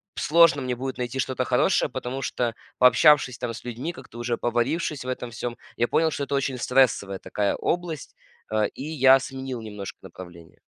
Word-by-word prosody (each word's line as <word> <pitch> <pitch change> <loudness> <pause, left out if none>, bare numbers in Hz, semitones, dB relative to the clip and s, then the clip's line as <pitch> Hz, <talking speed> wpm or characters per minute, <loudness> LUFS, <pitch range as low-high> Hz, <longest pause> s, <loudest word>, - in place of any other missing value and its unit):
сложно 165 -2 +4
мне 125 -1 -2
будет 130 +2 -5
найти 125 +1 -4
что-то 130 0 -1
хорошее, - - +2
потому 130 +2 -5
что, 120 -2 -1 0.3
пообщавшись 130 0 +5
там 120 -1 -4
с - - -9
людьми, 125 +7 -4
как-то 120 - -13
уже 120 0 -1
поварившись 125 +4 -1
в - - -7
этом 125 -1 -4
всём, 120 +1 -5 0.2
я 120 - +2
понял, 160 +4 +2
что 145 - -3
это 140 - -2
очень 135 -1 -1
стрессовая 125 -7 +2
такая 100 -1 -1
область. 170 -4 -3 0.4
А, 110 -1 +2
и - - -4
я 135 -3 +5
сменил 130 -2 -6
немножко 105 -3 -7
направление. 85 -3 -12
125 Hz, 180 wpm, -25 LUFS, 120-135 Hz, 0.4 s, пообщавшись